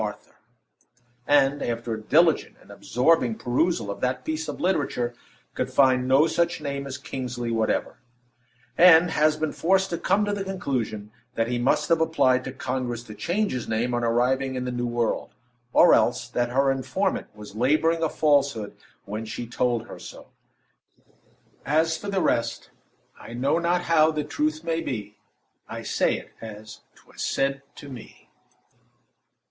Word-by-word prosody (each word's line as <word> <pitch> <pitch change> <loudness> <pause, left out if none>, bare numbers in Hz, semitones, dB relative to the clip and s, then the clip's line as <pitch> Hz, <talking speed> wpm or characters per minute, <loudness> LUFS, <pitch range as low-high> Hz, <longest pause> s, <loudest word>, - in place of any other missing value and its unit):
Arthur, - - -6 0.9
and, 145 0 +3
after 115 0 -3
a 110 - -5
diligent 160 +8 +3
and - - -17
absorbing 125 -3 +1
perusal 120 - 0
of - - -8
that 125 0 -1
piece 155 0 -3
of - - -6
literature, 145 -9 0 0.4
could - - -2
find 130 -2 +3
no 135 +4 +5
such 170 +1 0
name 140 -2 -4
as 135 0 -5
Kingsley 125 -3 -5
whatever; 110 -1 -1 0.8
and 175 -1 +7
has 155 0 +2
been 155 -1 -1
forced 190 +2 +1
to 170 - -2
come 210 +1 +2
to 205 - -1
the 200 -1 -2
conclusion 125 - -3 0.2
that 115 +1 0
he 120 0 -1
most 135 +4 +1
have 165 -1 +3
applied 130 -6 +2
to - - -5
Congress 125 -2 -3
to 110 - -10
change 195 - -1
his 125 -2 -4
name 115 +3 -1
on 120 0 0
arriving 130 +3 +1
in 125 0 -3
the 125 - -2
New 120 0 -2
World, 120 -1 -2 0.4
or - - +6
else - - +2
that 120 0 -1
her 135 +2 +2
informant 135 -1 -1
was 105 -1 -11
laboring 155 +8 +2
reader 165 0 0
a - - -7
falsehood 140 -9 +1 0.3
when 105 +3 -5
she 110 +2 -6
told 120 0 -1
her - - -10
so. - - -12 1.3
As 160 +3 +2
for 205 - -8
the 195 -2 0
rest, 115 - -1 0.5
"I - - -10
know 140 +6 +1
not 175 +1 +1
how 160 -2 +4
the 155 -1 -2
truth 155 +2 -2
may 165 0 -1
be; 105 -7 -5 0.5
I - - -6
say - - +1
it - - -12
as 110 -1 -9 0.2
'twas - - -13
said 135 0 0
to 145 - -11
me." 130 -5 -12
135 Hz, 165 wpm, -25 LUFS, 120-160 Hz, 1.3 s, and